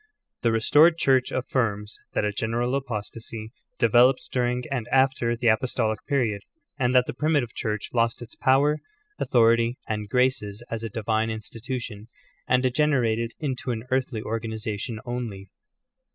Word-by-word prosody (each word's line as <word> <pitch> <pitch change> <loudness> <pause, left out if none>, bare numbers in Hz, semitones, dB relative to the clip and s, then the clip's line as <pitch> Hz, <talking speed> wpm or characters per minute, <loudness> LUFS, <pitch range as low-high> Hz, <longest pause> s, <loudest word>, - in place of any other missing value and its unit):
The 115 - +2
restored 150 +9 +5
Church 130 -5 +3
affirms 110 -5 -1
that - - +1
a 105 - 0
general 115 +4 -1
apostasy 115 -3 -5 0.3
de 115 - +3
veloped 125 +3 +4
during 125 0 0
and 125 -4 -2
after 130 -3 +2
the 120 0 +2
apostolic 110 -1 +1
period, 120 -8 0 0.4
and 125 -1 +2
that 125 -1 +6
the - - -4
primitive 145 -4 0
Church 105 -1 -3
lost 115 -1 +1
its 120 - -10
pov/er, 145 +3 +3 0.4
authority, 115 0 +3
and 105 -1 -3
graces 125 -4 0
as 115 -1 -3
a 115 - -4
divine 110 +1 -1
institution, 110 0 -6 0.4
and 125 0 +3
degenerated 120 -4 +1
into 130 -4 -3
an 115 -2 -2
earthly 130 -3 0
organiza 110 -1 -3
tion 115 -1 -4
only. 115 -6 -5
120 Hz, 145 wpm, -25 LUFS, 110-130 Hz, 0.4 s, that